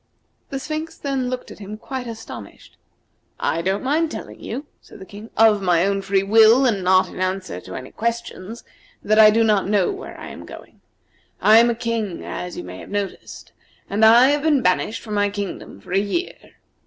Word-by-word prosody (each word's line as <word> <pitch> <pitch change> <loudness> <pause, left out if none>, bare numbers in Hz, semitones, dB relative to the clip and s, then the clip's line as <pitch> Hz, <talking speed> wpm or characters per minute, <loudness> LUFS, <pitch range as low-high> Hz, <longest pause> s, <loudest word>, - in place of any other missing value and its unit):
The 275 - -4
Sphinx 310 +4 -5
then 270 -3 -2
looked 255 0 -5
at - - -12
him 210 +1 -8
quite 255 +2 -6
astonished. 225 -1 -10 0.6
"I 165 - 0
don't 190 +5 -1
mind 310 +5 +1
telling - - -8
you," 280 - -5 0.2
said - - -15
the 190 - -11
King, 205 +3 -11
"of 215 -2 +5
my 180 -2 +2
own 195 0 0
free 195 0 +1
will, 225 +5 +6
and 205 -7 +1
not 185 +1 +4
in - - -10
answer 185 - -3
to 95 - -9
any 130 0 -8
questions, 230 -1 -4 0.4
that 215 +1 +3
I 215 -1 +9
do 225 +2 +3
not 210 -4 +2
know 205 - +2
where 395 +2 -9
I - - -8
am - - -10
going. - - -13 0.6
I 220 +1 +7
am 235 +1 +4
a 235 - 0
King, 230 -5 -3
as 180 0 -6
you - - -5
may 90 +1 -9
have - - -11
noticed, 200 -2 -5 0.4
and 210 +2 +1
I 235 +4 +7
have 290 0 +1
been 295 -4 +2
banished 185 +4 0
from 215 - -6
my 205 0 +2
kingdom 200 -2 -6
for - - -14
a 195 - +4
year. 210 - -2
215 Hz, 205 wpm, -21 LUFS, 195-245 Hz, 0.6 s, I